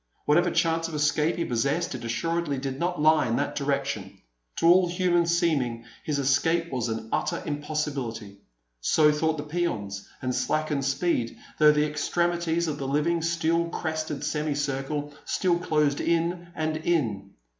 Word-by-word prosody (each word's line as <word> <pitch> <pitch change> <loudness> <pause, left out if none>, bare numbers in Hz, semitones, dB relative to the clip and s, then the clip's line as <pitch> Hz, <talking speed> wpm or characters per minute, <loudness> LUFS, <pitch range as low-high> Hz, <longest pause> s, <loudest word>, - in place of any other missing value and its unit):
Whatever 155 +4 +4
chance 165 0 +1
of 165 - -6
escape 150 +2 +2
he 170 - -1
possessed, 140 +9 0
it 125 -2 -6
assuredly 160 +5 -1
did 135 0 -4
not 175 0 -1
lie 155 -1 +4
in 115 - 0
that - - -1
direction. 140 -8 -2 0.4
To - - -1
all 175 +1 +6
human 175 -1 +2
seeming 145 -9 +1 0.2
his 150 -2 -1
escape 160 +5 +1
was 125 -3 -1
an 110 0 -4
utter - - -1
impossibility. 145 -9 -3 0.4
So 150 - +4
thought 160 +1 0
the 145 - -4
peons, 150 - -3
and 130 -1 -2
slackened 145 +2 0
speed, 135 -4 0 0.2
though 150 0 +8
the 150 0 +2
extremities 170 +2 0
of 150 -2 -3
the 135 - -3
living, 155 +5 +1
steel 170 0 +1
crested 155 -3 -3
semicircle 145 -1 -2
still 175 -2 +1
closed 150 -4 +1
in 170 +1 0
and 155 0 -1
in. 115 - -1
150 Hz, 155 wpm, -26 LUFS, 135-170 Hz, 0.4 s, though